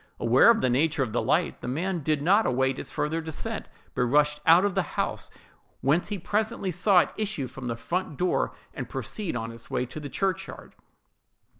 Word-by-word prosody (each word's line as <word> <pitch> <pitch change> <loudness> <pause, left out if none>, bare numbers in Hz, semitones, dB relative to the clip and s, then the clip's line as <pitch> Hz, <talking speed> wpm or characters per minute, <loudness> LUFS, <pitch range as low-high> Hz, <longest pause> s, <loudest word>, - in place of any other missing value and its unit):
Aware 125 - +5
of 230 -1 +5
the 130 - +2
nature 145 +2 +2
of 115 -5 -5
the - - +1
light, - - 0
the - - -6
man 170 +8 -1
did 150 -1 0
not 200 +7 +4
await 130 +1 +1
its - - -7
further 160 +2 -1
descent, 160 -1 -4 0.3
but 125 - -1
rushed 150 +3 +3
out 170 +4 +7
of 200 - 0
the - - +2 0.2
house—whence 150 +6 -2
he 205 - -3
presently 205 +1 -1
saw 180 +1 +4
it - - -2
issue 210 -10 -2
from 130 0 -8
the 115 - -2
front 155 +6 -3
door, 180 0 +1 0.2
and - - -6
proceed 200 - -3
on 115 -1 -3
its 115 0 -12
way 125 - -1
to 130 +5 -8
the 145 -1 -7
churchyard. 190 +1 -3
155 Hz, 195 wpm, -27 LUFS, 130-185 Hz, 0.3 s, out